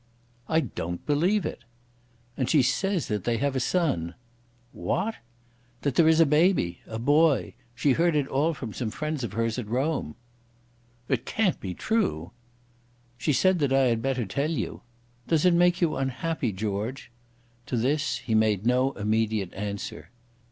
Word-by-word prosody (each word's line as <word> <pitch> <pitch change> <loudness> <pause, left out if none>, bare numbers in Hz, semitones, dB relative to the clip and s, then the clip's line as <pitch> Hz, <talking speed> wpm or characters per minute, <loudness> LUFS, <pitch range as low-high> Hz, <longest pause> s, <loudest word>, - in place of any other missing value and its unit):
"I 160 0 +3
don't 85 - -5
believe 175 +8 +2
it." - - -5 0.7
"And 130 - -1
she 150 -5 +4
says 175 - 0
that 105 -3 -2
they 120 -1 0
have 140 +2 -1
a - - +1
son." 120 - 0 0.6
"What!" 210 +6 -2 0.7
"That 140 - +1
there 160 +4 +4
is 160 0 +5
a 165 - +7
baby, 150 - +2
a 110 - -5
boy. 145 +4 +3 0.2
She 145 - +1
has 135 - +2
heard 170 -1 +3
it 145 -2 +1
all 155 +5 +1
from 115 -6 -6
some 120 -4 -3
friend 150 +4 -3
of 110 -4 -4
hers 115 +2 -1
at 115 - -5
Rome." 130 - -1 0.9
"It 130 -4 -1
can't 215 -5 +1
be 90 -2 -5
true." 190 - -1 0.9
"She 150 - +1
said 185 +7 +3
that 140 -3 +1
I 135 0 +4
had 115 -1 0
better 130 -3 -1
tell 140 +10 -1
you. 165 - -3 0.5
Does 160 0 +2
it 180 - +5
make 175 +1 +3
you 160 -3 +2
unhappy, 135 +1 -2
George?" 105 +7 -4 0.6
To 125 - -1
this 145 +6 0
he 115 - -1
made 110 -2 +2
no 130 +2 +2
immediate 105 -2 -1
answer. 100 0 -5
135 Hz, 165 wpm, -26 LUFS, 110-160 Hz, 0.9 s, a